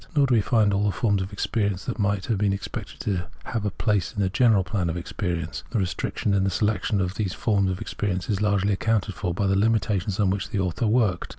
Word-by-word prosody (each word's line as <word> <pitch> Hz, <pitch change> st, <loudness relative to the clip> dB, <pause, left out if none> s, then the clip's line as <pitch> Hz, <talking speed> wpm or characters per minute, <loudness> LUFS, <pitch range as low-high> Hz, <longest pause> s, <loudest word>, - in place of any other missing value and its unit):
Nor 145 Hz, -2 st, +5 dB
do 130 Hz, -, +1 dB
we 115 Hz, -, +5 dB
find 105 Hz, -2 st, +2 dB
all 100 Hz, +1 st, +1 dB
the 100 Hz, -, +2 dB
forms 100 Hz, -2 st, +1 dB
of 95 Hz, +2 st, -4 dB
experience 100 Hz, -2 st, -1 dB
that 125 Hz, -, -4 dB
might 100 Hz, -2 st, 0 dB
have 110 Hz, -4 st, 0 dB
been 100 Hz, -1 st, +2 dB
expected 100 Hz, -, -6 dB
to 90 Hz, -4 st, -2 dB, 0.2 s
have 110 Hz, -3 st, -3 dB
a -, -, +2 dB
place 100 Hz, -4 st, 0 dB
in -, -, -4 dB
the 95 Hz, -2 st, +2 dB
general 115 Hz, -4 st, +4 dB
plan 90 Hz, -3 st, -1 dB
of 85 Hz, -, -3 dB
experience. 85 Hz, -2 st, -3 dB
This 115 Hz, -, 0 dB
restriction 95 Hz, +2 st, -1 dB
in 100 Hz, -1 st, +3 dB
the 95 Hz, -, +2 dB
selection 105 Hz, +2 st, 0 dB
of 95 Hz, -1 st, -1 dB
the 110 Hz, -, -1 dB
forms 100 Hz, +1 st, +1 dB
of 90 Hz, 0 st, -3 dB
experience 95 Hz, -3 st, -3 dB
is 105 Hz, -2 st, -1 dB
largely 100 Hz, -1 st, +2 dB
accounted 105 Hz, 0 st, 0 dB
for 90 Hz, -1 st, -3 dB
by 95 Hz, +4 st, -1 dB
the 95 Hz, -, +2 dB
hmitations 100 Hz, -2 st, +1 dB
under 95 Hz, -2 st, +3 dB
which -, -, -6 dB
the 100 Hz, -, -2 dB
author 95 Hz, +5 st, 0 dB
worked. 105 Hz, -5 st, +1 dB
100 Hz, 240 wpm, -25 LUFS, 95-105 Hz, 0.2 s, Nor